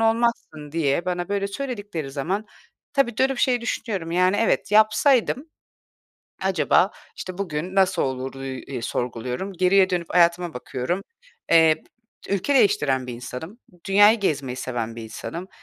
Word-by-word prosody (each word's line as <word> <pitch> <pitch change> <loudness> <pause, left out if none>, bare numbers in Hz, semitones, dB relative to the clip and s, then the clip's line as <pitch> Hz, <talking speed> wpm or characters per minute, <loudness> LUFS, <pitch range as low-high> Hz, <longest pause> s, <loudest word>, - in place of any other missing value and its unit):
olmazsın" 225 -10 0
diye 165 0 +1
bana 175 0 -2
böyle 200 -1 0
söyledikleri 205 - -5
zaman 180 +10 -2 0.5
tabii, 270 -5 +1
dönüp 265 0 +1
şey 245 -2 +2
düşünüyorum, 200 -7 -3
yani, 185 +3 +3
evet 225 -1 +1
yapsaydım 245 +6 +3 0.9
acaba, - - +3 0.3
işte, 185 0 -7
bugün 180 -1 -3
nasıl 190 -1 +3
oluru, 135 0 -4
üüü, 130 -1 -5
eee, 130 -4 -6
sorguluyorum. 125 - -3
Geriye 185 +1 +3
dönüp 175 -2 -1
hayatıma 170 -2 +3
bakıyorum. 130 +8 -3 0.5
Eee, 160 -1 +5 0.5
ülke 200 +8 0
değiştiren 145 - +3
bir 125 - -5
insanım. 125 - -8 0.3
Dünyayı 205 +3 +6
gezmeyi 140 -9 -1
seven 115 -3 -4
bir 115 - -6
insanım. 170 - -7
180 Hz, 135 wpm, -23 LUFS, 135-205 Hz, 0.9 s, Dünyayı